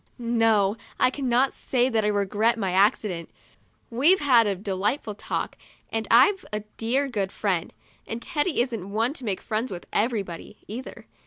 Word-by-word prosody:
No, 225 -4 +2 0.2
I 255 - +4
cannot 260 -1 +1
say 250 -1 +1
that 225 -4 +1
I - - +1
regret 210 +3 +1
my 195 -4 -1
accident. 190 -2 +1 0.6
We've 295 +11 +4
had 245 -6 +5
a 200 - 0
delightful 205 +4 -2
talk 205 - -4 0.4
and 225 -1 -2
I've 275 - +5
a 210 0 -2 0.2
dear 260 +5 +1
good 200 -7 -2
friend. 185 -5 -1 0.4
And 225 - -4
Teddy 295 +3 0
isn't 230 -7 -3
one 225 +6 0
to 270 - -9
make 195 -4 -2
friends 225 +3 -2
with 175 -2 -7
everybody, 210 -4 -2
either. 240 +5 -8
225 Hz, 160 wpm, -25 LUFS, 200-250 Hz, 0.6 s, had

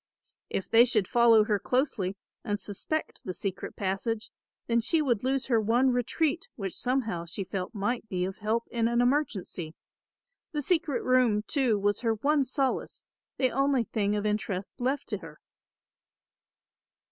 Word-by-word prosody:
If 190 - -3
they 230 +1 +7
should 220 -6 +2
follow 235 -2 +6
her 210 -2 0
closely 215 -8 0 0.3
and 205 -3 -2
suspect 210 +11 -3
the 185 - -5
secret 195 -2 -4
passage 215 +4 -2 0.3
then 235 0 +2
she 325 +8 +2
would 250 -8 +1
lose 265 0 0
her 230 -4 +2
one 240 +5 +3
retreat 315 - 0
which 195 -5 -4
somehow 235 -10 -1
she 170 +4 -4
felt 190 +4 -5
might 220 +2 -2
be 180 -1 -1
of 190 +1 -6
help 220 +2 -1
in 230 -2 +1
an 235 0 +1
emergency. 230 - 0 0.8
The 295 -1 -1
secret 315 -4 +1
room 250 -5 +3
too 255 -5 +1
was 205 +1 +1
her 225 -2 +1
one 285 +6 +2
solace, 265 +1 -1 0.3
the 255 -2 +2
only 275 -2 +2
thing 210 -1 -1
of 205 0 -2
interest 210 -2 -2
left 260 +3 -1
to 210 -4 -2
her. 165 -4 -12
230 Hz, 160 wpm, -28 LUFS, 200-255 Hz, 0.8 s, they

